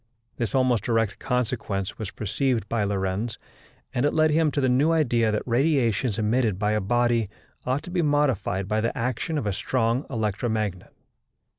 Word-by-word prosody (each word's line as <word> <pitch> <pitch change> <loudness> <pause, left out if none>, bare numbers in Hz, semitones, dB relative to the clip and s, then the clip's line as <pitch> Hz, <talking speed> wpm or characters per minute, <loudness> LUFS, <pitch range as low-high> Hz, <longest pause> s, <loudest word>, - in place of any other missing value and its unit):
This 120 +2 -2
almost 130 -5 +2
direct 115 -3 0
consequence 115 -6 -2
was 110 -4 -4
perceived 115 +1 -1
by 115 -3 0
Lorentz, 100 +2 -2 0.6
and 125 - 0
it 145 - +1
led 155 0 +4
him 160 0 +3
to 145 - -2
the 130 - +2
new 135 +6 +3
idea 120 -9 +2
that 105 - -1
radiations 120 -4 +1
emitted 110 -2 +1
by 105 +1 0
a 105 0 +1
body 120 +1 +1 0.4
ought 130 +3 0
to 180 - -8
be 180 -1 +1
modified 145 - +1
by 110 +1 0
the 115 +5 -2
action 130 +6 -2
of 145 - -2
a 100 - 0
strong 120 +5 0
electromagnet. 110 -4 -2
115 Hz, 170 wpm, -25 LUFS, 105-130 Hz, 0.6 s, led